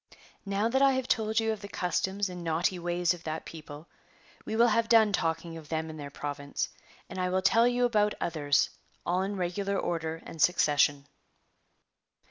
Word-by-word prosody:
'° - - -18 0.3
Now 200 +2 +1
that 265 +3 +1
I 275 -1 +6
have 260 -1 -1
told 220 -2 +1
you 225 0 +1
of 215 -2 -4
the 200 - -7
customs 190 +2 -1
and 180 -1 -7
naughty 170 +3 0
ways 175 0 +1
of 175 -1 -11
that 155 0 -4
people, 155 0 -10 0.6
we 220 - -3
will 235 +1 +5
have 230 +1 +1
done 220 -3 +5
talking 165 -1 -1
of 155 -2 -12
them 160 0 -2
and 155 - -9
their 145 -1 -6
province, 145 0 -4 0.4
and - - -7
I 180 0 0
will 185 +1 0
tell 230 +4 +5
you 245 0 +2
about 210 -3 +2
others, 145 -4 +1 0.3
all 180 +2 +1
in 200 +2 -2
regular 195 +2 -1
order 165 -2 -2
and 165 - -7
succession. 145 -4 +3
180 Hz, 190 wpm, -29 LUFS, 160-210 Hz, 0.6 s, I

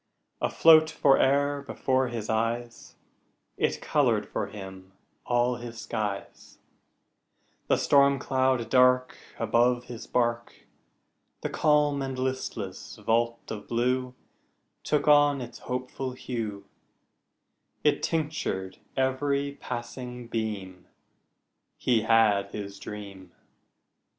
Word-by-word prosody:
Afloat 160 -1 +6
fore'er 140 -1 +3
before 130 -1 0
his 115 -3 -5
eyes, 115 +2 -2 0.6
It - - -1
colored 120 -8 +1
for - - -3
him 95 -2 -10 0.3
all 120 0 +2
his 120 -1 -8
skies: 105 -2 -5 1.1
The - - +3
storm 140 -1 +4
cloud 130 -3 +1
dark 125 0 +4 0.2
Above 120 +1 +2
his 120 -2 -9
bark, 120 -1 -1 0.8
The - - -2
calm 150 -2 +2
and 135 -1 -4
listless 130 0 -4
vault 115 +1 -1
of 105 -2 -6
blue 125 +2 0 0.7
Took 150 0 0
on 145 -1 +5
its 120 -1 -8
hopeful 125 +1 -3
hue, 110 -6 -5 1.2
It 150 - +3
tinctured 150 - -2 0.2
every 140 +2 0
passing 125 0 -6
beam 100 -5 -4 0.9
He 120 -3 +2
had 110 -3 +3
his 100 -1 -7
dream. 100 -4 -9
125 Hz, 100 wpm, -27 LUFS, 110-135 Hz, 1.2 s, Afloat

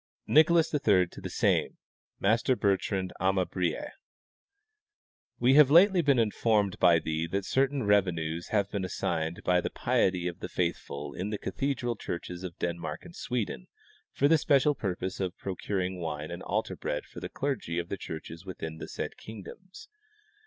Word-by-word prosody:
(Translation.) - - -4
Nicholas 160 +2 +5
III 100 -11 +3
to - - -11
the - - -5
same - - +1 0.4
(Master 115 +6 +2
Bertrand 95 -3 0
Amabric): 95 - 0 1.5
We 125 +2 +4
have 145 -1 +7
lately 180 +4 +6
been 140 -4 +3
informed 105 -3 +1
by 85 -2 +6
thee 80 0 -2
that 95 +3 -2
certain 135 0 +1
revenues 85 -5 +1
have 100 -2 0
been 100 -2 -2
assigned 85 -2 -2
by 90 0 +3
the - - -2
piety 90 -2 +1
of 85 - -5
the - - -6
faithful 75 -5 -3
in 95 +3 -4
the 105 - -2
cathedral 120 +4 -2
churches 90 -3 -6
of 90 -2 -7
Denmark 85 -2 -4
and 170 -1 -12
Sweden 115 - -3 0.4
for 140 - +2
the 160 +1 +5
special 145 0 +3
purpose 95 -5 -3
of 95 -1 -3
Ijrocuring 95 -1 -3
wine 80 -2 -4
and 85 - -6
altar - - -2
bread 75 - -3
for - - -10
the - - -6
clergy 130 -12 -3
of 85 0 -2
the 100 - -3
churches 80 0 -8
within 80 -4 -7
the - - -6
said - - -5
kingdoms. 115 - -11
95 Hz, 165 wpm, -29 LUFS, 85-125 Hz, 1.5 s, have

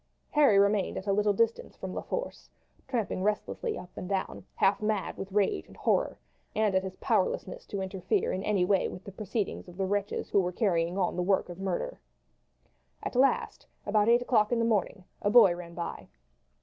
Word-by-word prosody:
Harry 285 -9 +5
remained 200 0 +2
at 190 - -5
a 200 - +1
little 210 +1 +3
distance 225 +3 0
from - - -6
La - - -3
Force, - - -5 0.4
tramping 230 -8 -2
restlessly 210 - -1
up 180 - -9
and 180 - -6
down, 195 -1 -2
half 200 +2 +2
mad 210 -3 -1
with 195 0 -7
rage 195 - +1
and - - -16
horror, - - +1 0.4
and 215 -2 +2
at 190 - +3
his 190 0 -6
powerlessness - - -1
to 200 - -4
interfere 190 -1 -1
in 185 - -2
any 200 -4 +2
way 195 0 +2
with 185 - -9
the 200 - -9
proceedings 205 +1 -3
of 175 0 -12
the 195 - 0
wretches 200 +1 -2
who - - +4
were 180 -1 0
carrying 175 -3 0
on 185 -2 0
the 180 - -1
work 190 0 +1
of 175 +1 -8
murder. 195 - -3 1.0
At - - -4
last, 270 +2 +1 0.2
about 210 +1 +3
eight 240 +1 +5
o'clock 220 -4 +2
in 240 - +2
the 230 - +2
morning, 210 -3 0 0.2
a 205 - +1
boy 210 -6 +7
ran 170 -1 -9
by. 170 -1 -5
200 Hz, 200 wpm, -29 LUFS, 185-215 Hz, 1.0 s, boy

